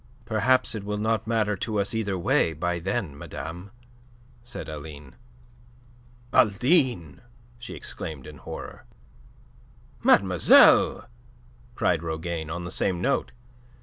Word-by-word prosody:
"Perhaps 115 +4 +2
it 110 -3 -5
will 105 +1 -3
not 110 0 -1
matter 110 -2 +1
to 105 +2 -2
us 100 +4 -1
either 105 -4 -1
way 85 -1 +1
by 85 +2 -2
then, 95 -3 -3
madame," 80 +7 -8 0.7
said 120 -9 -8
Aline. 75 -2 -9 1.2
"Aline!" 115 - +2 0.4
she 120 - -8
exclaimed 75 -5 -7
in 75 -1 -11
horror. - - -9 1.2
"Mademoiselle!" 95 -3 +5 0.7
cried 85 -3 +1
Rougane 80 -1 -4
on 85 +2 -4
the 85 - -6
same 90 -1 0
note. 135 +10 0
90 Hz, 115 wpm, -25 LUFS, 80-110 Hz, 1.2 s, Mademoiselle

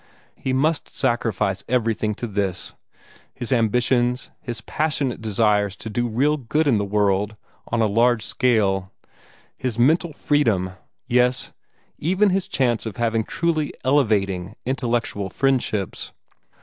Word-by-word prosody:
He 130 - -3
must 150 +4 +1
sacrifice 110 -6 0
everything 110 -3 0
to 120 - -4
this, 100 -4 -1 0.6
his 120 +2 -1
ambitions, 125 +2 +1
his 120 -3 -5
passionate 145 -5 -1
desires 105 -2 +1
to 110 - -7
do 120 +3 0
real 140 +7 +2
good 150 +4 0
in 125 -7 +3
the 100 - -1
world 100 +1 +1 0.3
on 115 -1 +1
a - - +4
large 115 +2 +2
scale, 95 -6 +1 0.6
his 125 -3 -3
mental 160 +7 +3
freedom, 115 -12 +1 0.3
yes, 125 0 +2 0.5
even 190 +5 +2
his 190 0 0
chance 120 -4 0
of 105 - -7
having 115 -1 +1
truly 165 0 -1
elevating, 105 -8 +1
intellectual 120 -6 -1
friendships. 125 -6 -1
120 Hz, 125 wpm, -22 LUFS, 105-135 Hz, 0.6 s, a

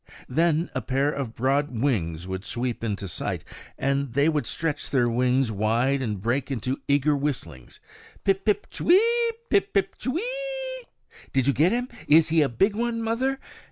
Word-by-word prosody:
Then 165 +4 +1
a - - -2
pair 135 +3 +1
of 135 -6 -4
broad 135 -1 0
wings 90 - 0
would 95 0 -4
sweep 120 +2 -3
into 100 -3 -2
sight, 85 - -3 0.3
and 140 -2 -1
they 140 +4 +3
would 150 -7 -1
stretch 155 0 -2
their 125 -3 +2
wings 125 +1 +2
wide 115 +6 +1
and 105 -6 -2
break 120 +7 -1
into 130 0 -2
eager 145 +1 +3
whistlings, 125 - -4 0.4
Pip, 195 0 +1
pip, 210 -2 +1
ch'wee? 350 +3 +4 0.5
chip, 400 - +3 0.3
ch'weeeeee? - - -3 0.5
"did 130 -2 +2
you 140 - +3
get 160 +6 +3
him? 245 +2 0 0.2
is 155 +1 +6
he 160 0 +4
a 145 - +2
big 195 - +2
one, 230 0 -1
mother?" 260 +4 0
140 Hz, 160 wpm, -25 LUFS, 120-195 Hz, 0.5 s, is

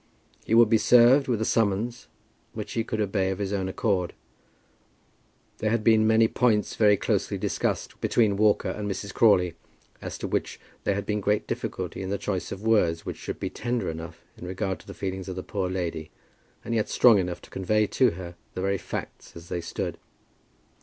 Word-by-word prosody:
He 115 - +3
would 115 0 +7
be 110 0 +3
served 125 +5 +6
with 120 -4 0
a - - +1
summons, 115 +3 0 0.5
which - - -6
he 115 - 0
could 110 -1 -4
obey 95 -2 0
of 95 - -2
his 100 0 -3
own 95 -2 -1
accord. 95 -4 -1 1.4
There 110 - 0
had 115 0 0
been 110 0 +5
many 110 0 +5
points 110 -3 +1
very 105 -2 +5
closely - - -1
discussed - - -2
between 110 -4 +2
Walker 105 +1 +2
and 105 -1 -4
Mrs. 100 0 -5
Crawley, 90 -6 +4 0.5
as - - -6
to - - -4
which - - -2 0.3
there 100 - +2
had 100 0 -3
been 105 0 -1
great 105 +1 +1
difficulty - - -4
in 95 - -4
the 100 - -1
choice 95 -3 -3
of 95 +2 -6
words 90 -7 +2
which - - -5
should - - -6
be - - -3
tender 120 -6 -2
enough 80 +1 -9
in 90 - -9
regard 95 +1 -3
to - - -18
the - - -9
feelings 95 0 -4
of 95 - -5
the 95 - -5
poor 95 -3 -2
lady, 85 -4 -3 0.6
and - - -3
yet 110 -2 0
strong 115 -5 +6
enough 90 -1 -2
to - - -15
convey 105 +3 +1
to 125 +4 +3
her 85 0 -8 0.2
the 95 - -3
very 100 0 0
facts - - -7
as 85 0 -11
they 85 - -2
stood. - - -4
100 Hz, 200 wpm, -26 LUFS, 95-110 Hz, 1.4 s, would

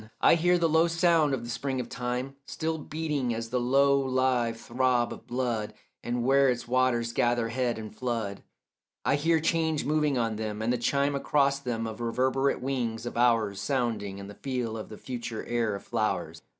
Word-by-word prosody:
I - - +6
hear 175 +2 +3
the 170 -1 +2
low 160 +1 +4
sound 170 -3 +3
of 120 - -7
the 120 - -7
spring 135 +1 -2
of 125 - -3
time 125 +3 -3
Still 160 0 -2
beating 150 -6 -2
as 115 0 -4
the 125 - +1
low 140 +3 +4
live 130 -3 +1
throb 125 0 +1
of - - -13
blood, 120 -4 -2 0.3
And 120 0 -2
where 135 +1 +5
its 125 -1 -2
waters 120 -2 +1
gather 120 -1 +1
head 120 0 -1
and 110 -1 -8
flood 115 -5 -3 0.6
I - - +3
hear 160 +3 +2
change 160 -1 0
moving 150 -2 +1
on 115 -2 0
them, 105 -1 -4
and 115 +3 +1
the 125 - -1
chime 140 +4 +1
Across 140 0 +2
them 120 -4 -3
of 110 +1 -6
reverberate 130 +4 +1
wings 120 -4 -2
of 120 - -5
hours 115 -5 +2
Sounding, 115 -6 -1
and 100 +1 -9
feel 125 -4 -2
the 105 - -11
future 120 -3 -5
air 115 -3 0
of 100 - -8
flowers. 110 -3 -2
125 Hz, 185 wpm, -28 LUFS, 115-140 Hz, 0.6 s, I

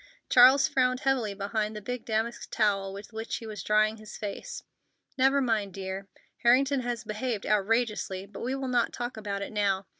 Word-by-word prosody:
Charles 260 +3 +7
frowned 255 -4 +1
heavily 245 -7 0
behind 210 +2 -2
the - - -4
big 245 +3 -5
damask 230 +1 -2
towel 195 -3 +1
with 200 +3 -10
which 220 +1 -4
he 230 - -6
was 215 -2 -6
drying 215 +1 +2
his 215 -1 -10
face. 205 -2 -6 0.5
"Never 270 +1 +3
mind, 215 -6 0
dear. 190 0 -5 0.3
Harrington 265 +3 +4
has 240 -2 -3
behaved 215 0 -3
outrageously, 210 -2 0
but 200 0 -11
we 255 +3 -1
will 270 -1 -3
not 245 -2 +1
talk 240 +1 -4
about 200 -2 -4
it - - -6
now. 200 -2 0
220 Hz, 180 wpm, -28 LUFS, 205-250 Hz, 0.5 s, Charles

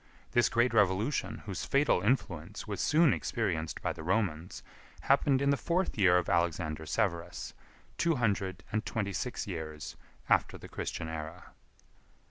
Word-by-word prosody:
This 120 - +4
great 120 +1 +2
revolution, 105 +5 +1
whose 100 -3 -4
fatal 140 -9 +2
influence 95 - -1
was - - -3
soon 155 -1 +4
experienced 85 -9 -2
by - - 0
the - - -9
Romans, 90 -2 -1 0.4
happened 140 -1 +3
in 140 - +3
the - - +4
fourth 175 +5 0
year 95 -4 +5
of 90 - 0
Alexander 85 -3 0
Severus, 85 -3 -2 0.5
two 170 -1 +3
hundred 100 -5 -1
and 110 0 0
twenty 100 -3 -2
six 125 - -3
years 80 -5 -6 0.3
after - - +2
the - - -11
Christian 80 - -4
era. 80 0 -7
95 Hz, 145 wpm, -31 LUFS, 85-120 Hz, 0.5 s, year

